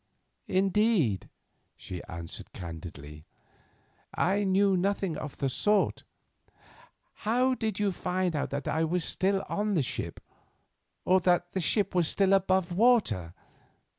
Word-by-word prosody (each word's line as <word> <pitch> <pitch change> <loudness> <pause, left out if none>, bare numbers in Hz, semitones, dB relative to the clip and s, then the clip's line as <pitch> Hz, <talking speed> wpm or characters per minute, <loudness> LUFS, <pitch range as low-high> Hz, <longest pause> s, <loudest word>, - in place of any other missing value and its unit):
"Indeed," 190 - +1 0.5
she 90 -1 -7
answered 85 0 -7
candidly, 75 -3 -9 0.9
"I 200 +3 +1
knew 195 0 +3
nothing 190 -2 0
of 150 -1 -7
the 135 - 0
sort. 205 +10 +1 1.2
How 250 +4 +2
did 220 -5 -2
you 205 -1 +1
find 180 -1 -1
out 145 - -1
that 140 +1 -4
I 160 - +1
was 170 +2 0
still 195 +1 0
on 205 0 -1
the 155 - +2
ship, - - -4 0.9
or 185 +1 +5
that 175 0 +1
the 190 - -2
ship 200 +5 +1
was 175 -3 +2
still 195 +2 +2
above 190 -2 +2
water? 200 - +2
185 Hz, 130 wpm, -29 LUFS, 150-200 Hz, 1.2 s, or